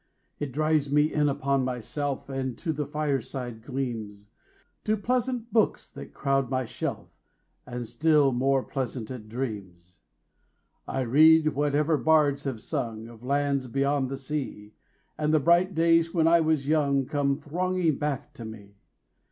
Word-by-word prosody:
It 145 -2 -3
drives 155 0 +1
me 150 +1 +3
in 150 -1 +2
upon 140 -1 0
myself 130 +3 -3
5 135 -1 -7
And 130 -2 -3
to 165 -3 -2
the 150 -1 -3
fireside 135 -5 -3
gleams, 110 -6 -5 0.6
To 215 0 +1
pleasant 245 +2 -1
books 220 -3 +2
that - - -10
crowd 135 -2 0
my 130 -1 -1
shelf, - - -5 0.6
And 125 -1 -5
still 145 +4 +3
more 135 +1 +1
pleasant 125 -3 -5
dreams. 95 -8 -6 0.9
I 135 - -2
read 155 +5 +6
whatever 150 +2 +1
bards 145 -3 +3
have 125 -5 -3
sung 115 -1 -4
Of 115 -1 -14
lands 140 0 0
beyond 140 +1 0
the 135 - -4
sea, 135 -7 -5 0.4
10 155 - -2
And 155 - +2
the - - +5
bright 170 +5 +3
days 165 0 +3
when 165 -1 +4
I 170 +1 +6
was 155 -3 +1
young 140 -3 +2
Come 140 0 0
thronging 175 0 -1
back 145 -2 -3
to 115 - -9
me. 105 -2 -11
140 Hz, 150 wpm, -27 LUFS, 125-155 Hz, 0.9 s, read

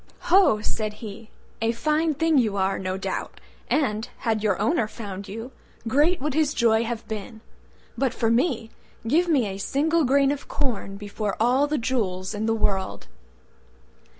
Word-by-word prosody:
"Ho!" 365 - +6
said 215 0 -2
he, 215 0 -9 0.3
"a 225 +1 +2
fine 305 +5 +1
thing 325 -1 +3
you 215 -5 +1
are, 190 0 +1
no 185 0 -2
doubt, 190 - -4 0.3
and, 245 -5 0
had 220 -2 0
your 205 -3 +1
owner 220 - +2
found 200 -3 -7
you, 225 +6 -7 0.4
great 295 +9 +3
would 295 +1 -2
his 305 -1 +1
joy 225 -1 +3
have 230 -1 -4
been. 220 +1 -6 0.5
But 260 0 +1
for 230 -3 0
me! 235 -3 +1 0.4
give 330 +9 +3
me 285 -8 +3
a 195 -1 -5
single 315 +9 +1
grain 275 +1 +4
of 285 -1 -5
corn 225 -8 -2
before 205 0 -3
all 255 +5 +3
the 300 +1 0
jewels 210 -7 -1
in 215 +1 -2
the 225 - +2
world." 195 -3 -1
230 Hz, 165 wpm, -25 LUFS, 210-280 Hz, 0.5 s, Ho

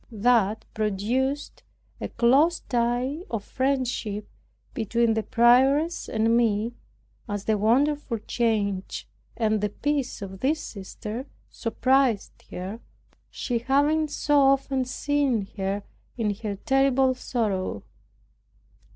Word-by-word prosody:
That 220 -1 +2
produced 225 +7 -1 0.4
a - - -3
close 285 +8 +3
tie 245 +4 0
of 225 -3 -3
friendship 255 -6 -1 0.5
between 230 0 +1
the 220 - 0
prioress 265 +9 +3
and 225 +1 +2
me, 230 -1 +1 0.6
as 205 -1 -3
the 220 - +2
wonderful 255 +4 +2
change 210 -3 -1 0.3
and 215 -2 +1
the 210 - 0
peace 280 0 -2
of 190 -1 -8
this 300 +4 +1
sister 220 +3 -7 0.2
surprised 255 -1 +1
her, 190 +5 -6 0.5
she 240 -3 -2
having 290 +5 +2
so 295 0 +2
often 270 -1 +3
seen 265 -4 0
her 195 +1 -2 0.3
in 215 -3 0
her 210 -2 -4
terrible 270 +3 +2
sorrow. 210 - -2
235 Hz, 110 wpm, -26 LUFS, 210-270 Hz, 0.6 s, close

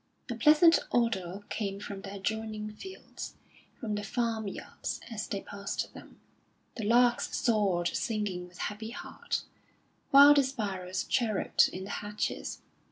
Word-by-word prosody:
A - - 0
pleasant 305 +7 +6
odour 200 -5 0
came 200 -2 -3
from 200 -1 -6
the 195 0 -7
adjoining 215 +1 -3
fields, 380 - -9 0.4
from 225 -5 -3
the 210 - -1
farm 225 0 -1
yards, 195 - -5
as 215 -2 -4
they 200 - -3
passed 200 0 -4
them; - - -13 0.6
the 225 - -4
larks 240 +2 +3
soared 195 -7 +2
singing 205 -5 -2
with 180 0 -17
happy 215 +2 -4
heart, 235 - -4 0.7
while 280 +1 +10
the 285 - +5
sparrows 195 -8 -2
chirruped 220 -6 +2
in 185 - -6
the 195 - -6
hedges. 210 0 -3
215 Hz, 140 wpm, -30 LUFS, 195-235 Hz, 0.7 s, while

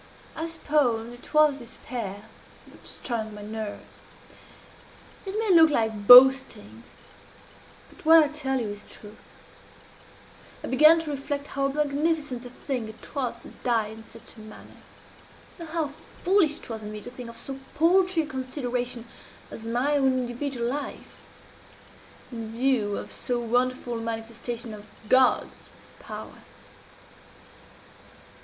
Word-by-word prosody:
I 320 +1 -3
suppose 260 -8 0
it 245 - -14
was 305 -2 +4
despair 230 -4 -7 0.4
that - - -12
strung 220 -3 -3
my 205 - -9
nerves. 215 -1 -7 1.3
"It 390 +2 -3
may 440 -3 +2
look 320 -1 +8
like 220 -6 -1
boasting 250 - +7 1.1
but - - -18
what 325 +1 +8
I 310 -2 +6
tell 270 -3 -2
you 225 -3 -3
is 205 0 -8
truth 210 0 -13 1.4
I - - -5
began 305 +5 +6
to 310 -2 -5
reflect 280 0 -4
how 275 0 +1
magnificent 290 -2 -1
a - - -10
thing 250 -2 -4
it 220 - -13
was 270 -4 -2
to - - -11
die 230 -4 +1
in 220 +1 -11
such 230 +1 -12
a - - -14
manner, 215 0 -13 0.8
and 335 -2 -8
how 320 -2 -1 0.3
foolish 350 -5 +3
it - - -11
was 220 -1 -5
in 210 0 -7
me 215 - -6
to 245 - -9
think 250 -2 -9
of 230 - -10
so 270 +3 -6 0.2
paltry 355 +1 +3
a - - -6
consideration 250 -3 -4 0.5
as 225 - -9
my 250 +6 +1
own 265 -2 +3
individual 245 0 -3
life, 285 +4 -5 1.1
in 225 -2 -6
view 230 -4 +1
of - - -6
so 245 -1 -1
wonderful 245 0 -1
a - - -6
manifestation 230 +1 -5
of 210 0 -11 0.2
God's 255 +2 +2 0.3
power. - - -9
250 Hz, 140 wpm, -26 LUFS, 225-290 Hz, 1.4 s, look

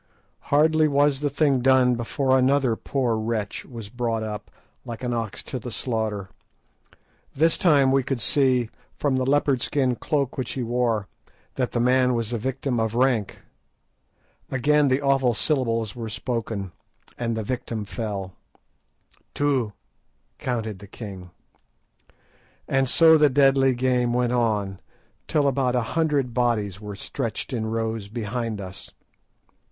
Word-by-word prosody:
Hardly 155 +2 +4
was 145 -1 +2
the 145 0 0
thing 140 -1 +2
done 130 0 +4
before 130 +3 0
another 130 -2 +3
poor 125 -2 -1
wretch 110 -2 -3
was 115 -6 -8
brought 115 -1 -2
up, 105 -1 -6 0.3
like 115 +1 -7
an 120 -1 -1
ox 115 -3 -4
to 130 - -5
the 125 - -7
slaughter. 110 -4 -2 1.1
This 160 +3 +3
time 140 -6 +4
we 135 0 +4
could 130 0 -3
see, 125 -2 +2 0.3
from 140 -3 +1
the 130 0 0
leopard 140 -2 +2
skin 130 -4 +1
cloak 140 0 -1
which 120 -2 -3
he 130 - -3
wore, 115 -3 0 0.5
that 125 -2 -2
the 120 - 0
man 125 +1 +3
was 115 0 -2
a 120 - -1
person 130 +1 -2
of 110 0 -1
rank. 120 -5 +1 1.1
Again 145 +3 +3
the 135 +2 +1
awful 135 -4 +2
syllables 115 -7 0
were 115 -2 -5
spoken, 110 -4 -3 0.5
and 115 -2 -1
the 110 - -2
victim 115 -2 -4
fell 100 -3 -4
dead. 90 - -33
"Two," 135 -7 +1 0.7
counted 110 -5 -3
the 100 - -11
king. 95 -4 -9 1.4
And 135 -1 +1
so 160 +2 +6
the 150 -1 +6
deadly 135 -1 +4
game 125 -1 +1
went 125 0 +1
on, 105 -5 0 0.5
till 145 -2 +2
about 130 -2 +1
a 125 - +2
hundred 145 -6 +1
bodies 110 -5 0
were 105 -1 -6
stretched 110 +5 -4
in 110 -3 -2
rows 110 -2 -2
behind 115 0 -3
us. 95 0 -9
125 Hz, 145 wpm, -24 LUFS, 110-135 Hz, 1.4 s, so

